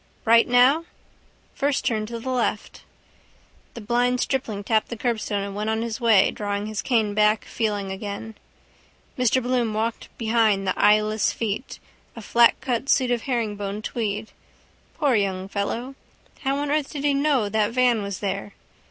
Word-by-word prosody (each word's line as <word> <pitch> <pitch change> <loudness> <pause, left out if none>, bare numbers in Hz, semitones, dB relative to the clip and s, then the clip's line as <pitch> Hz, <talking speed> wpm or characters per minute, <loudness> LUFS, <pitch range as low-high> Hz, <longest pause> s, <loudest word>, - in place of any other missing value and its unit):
—Right 230 +1 +5
now? 255 +7 +4 0.7
First 280 0 -1
turn 215 -2 0
to 235 +1 -6
the 260 +3 -4
left. 240 -4 -2 0.9
The 235 - -7
blind 245 +3 +1
stripling 230 -7 -2
tapped 220 +1 +1
the 235 - -5
curbstone 220 -4 -1
and 200 0 -6
went 210 +1 -2
on 220 +1 0
his 230 +1 -4
way, 220 -5 +5
drawing 205 0 -3
his 215 -1 -3
cane 220 -5 +1
back, 210 +1 +2
feeling 205 -3 -2
again. 200 +3 -6 0.8
Mr 250 0 +2
Bloom 245 -3 0
walked 225 +1 -2
behind 220 -3 +2
the 185 - +1
eyeless 215 +1 +3
feet, 225 +3 -4 0.4
a 230 - -8
flatcut 240 +3 +2
suit 255 -2 +3
of 240 -2 0
herringbone 210 -5 -3
tweed. 215 -2 -3 0.6
Poor 285 -4 +1
young 195 -3 0
fellow! 220 +6 -3 0.5
How 270 0 -1
on 285 0 -2
earth 300 -2 0
did 285 -2 -6
he 290 -1 +3
know 275 -5 +2
that 210 +1 0
van 245 -2 +2
was 200 -2 -5
there? 110 - -3
225 Hz, 160 wpm, -24 LUFS, 210-250 Hz, 0.9 s, Right